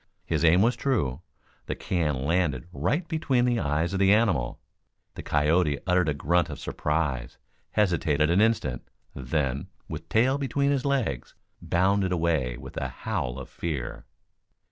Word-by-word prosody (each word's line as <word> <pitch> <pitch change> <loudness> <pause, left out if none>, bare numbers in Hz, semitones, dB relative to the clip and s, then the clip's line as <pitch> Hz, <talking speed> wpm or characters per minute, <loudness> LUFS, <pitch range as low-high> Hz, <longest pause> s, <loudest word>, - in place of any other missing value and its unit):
His - - 0
aim 85 +4 +5
was 120 +1 +3
true. 90 - -1 0.5
The - - -2
can 75 -7 -1
landed 80 -4 0
right 95 - -1
between 150 -7 +1
the 120 -1 +1
eyes 80 +3 0
of 95 - -1
the 100 0 +5
animal. 95 - +2 0.5
The - - -7
coyote 75 0 +2
uttered 90 -3 +2
a 75 - 0
grunt 85 +5 +1
of - - -6
surprise, 75 -6 -2 0.4
hesitated 80 -6 +2
an 90 +4 +4
instant, 110 - +1 0.3
then, 65 0 -2 0.2
with 80 +1 -7
tail 130 +7 +3
between 140 +1 +1
his 140 -2 0
legs, 125 - -1 0.3
bounded 95 +2 +1
away 80 -8 0
with - - -10
a - - -1
howl - - -3
of 65 - -7
fear. 75 -8 -5
85 Hz, 150 wpm, -27 LUFS, 70-105 Hz, 0.5 s, aim